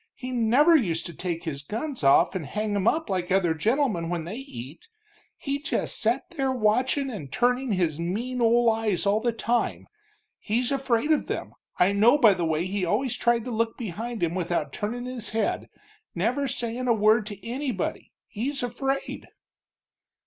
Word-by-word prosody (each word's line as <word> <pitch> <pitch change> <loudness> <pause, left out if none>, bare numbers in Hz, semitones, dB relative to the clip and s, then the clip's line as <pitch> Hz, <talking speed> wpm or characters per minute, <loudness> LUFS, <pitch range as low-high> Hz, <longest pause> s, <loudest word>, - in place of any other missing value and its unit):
He 255 0 -6
never 255 +8 +4
used 175 - +1
to 170 - -6
take 170 -2 -4
his 145 -4 -4
guns 235 - -5
off 135 +6 +5
and 190 -4 -3
hang 210 0 -2
'em 200 +1 0
up 320 +6 +2
like 185 -3 -2
other 180 -3 +3
gentlemen 215 - 0
when 175 -2 -2
they 180 +8 -6
eat. 155 - -9 0.5
He 280 0 -2
just 295 - -1
set 235 +4 +1
there 270 -5 -1
watchin' 255 +4 +1
and 150 - -7
turnin' 250 -1 +1
his 170 -5 0
mean 230 +9 -2
old 235 0 +4
eyes 215 -4 0
all 200 +2 +3
the 235 +1 0
time. 230 +1 -1 0.5
He's 240 +4 0
afraid 270 0 +1
of 305 - +2
them, - - -4 0.2
I 180 +2 +4
know 220 +7 +5
by 225 -8 +6
the 175 -2 -2
way 160 +1 0
he 195 +1 -2
always 225 +8 0
tried 235 -2 +1
to 250 - -4
look 225 0 -1
behind 225 0 -4
him 170 0 +1
without 175 -1 -2
turnin' 240 +4 -3
his 250 -3 -4
head, 220 +1 -1 0.5
never 240 +10 0
sayin' 245 0 -3
a 235 - +5
word 215 0 +3
to 205 -2 -9
anybody, 250 -5 -3
he's 260 +5 -3
afraid." 270 +3 -3
225 Hz, 180 wpm, -26 LUFS, 185-255 Hz, 0.5 s, by